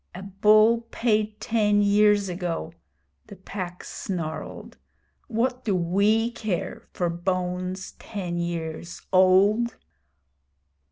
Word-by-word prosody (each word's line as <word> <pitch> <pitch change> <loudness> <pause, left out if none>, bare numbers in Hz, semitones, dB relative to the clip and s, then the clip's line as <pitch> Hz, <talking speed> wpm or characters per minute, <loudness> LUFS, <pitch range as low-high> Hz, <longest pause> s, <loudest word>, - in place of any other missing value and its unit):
'A 185 - -7
bull 215 +4 +4
paid 215 -3 0
ten 210 -2 +2
years 205 0 +4
ago!' 175 -2 -4 0.5
the 205 - -10
Pack 185 -1 -7
snarled. 165 -5 -6 0.5
'What 250 +1 -1
do 205 -4 0
we 200 +6 +2
care 215 -6 -4
for 175 - -1
bones 180 +2 -2
ten 180 -5 -4
years 170 0 -5
old?' 200 +5 +4
195 Hz, 100 wpm, -25 LUFS, 180-215 Hz, 0.5 s, bull